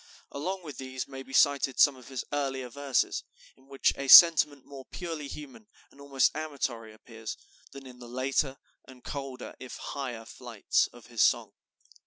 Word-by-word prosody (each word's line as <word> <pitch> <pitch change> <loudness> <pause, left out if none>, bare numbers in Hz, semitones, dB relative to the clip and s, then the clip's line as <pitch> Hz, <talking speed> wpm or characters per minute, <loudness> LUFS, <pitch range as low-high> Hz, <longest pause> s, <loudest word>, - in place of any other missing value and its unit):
Along 185 +6 -4
with 150 -5 -9
these 130 -1 -5
may 135 -1 -8
be 135 - -13
cited 140 -1 +2
some 145 - +6
of 130 -2 -15
his 130 -2 -5
earlier 135 -3 -2
verses, 140 +1 -1 0.3
in 130 0 -25
which 135 -1 +1
a 140 - -5
sentiment 150 -3 +8
more 135 -2 -11
purely 165 -5 -6
human 150 +9 -10 0.2
and 140 - -17
almost 140 -2 +1
amatory 135 -7 -4
appears, 110 0 -9 0.3
than 140 -1 -11
in 125 -1 -13
the 120 -1 -11
later 135 +2 -1 0.3
and 130 -2 -15
colder, 135 -2 -7
if 130 - -9
higher 125 -5 -6
flights 115 -2 -1
of - - -16
his - - -3
song. - - +3
135 Hz, 170 wpm, -28 LUFS, 130-140 Hz, 0.3 s, sentiment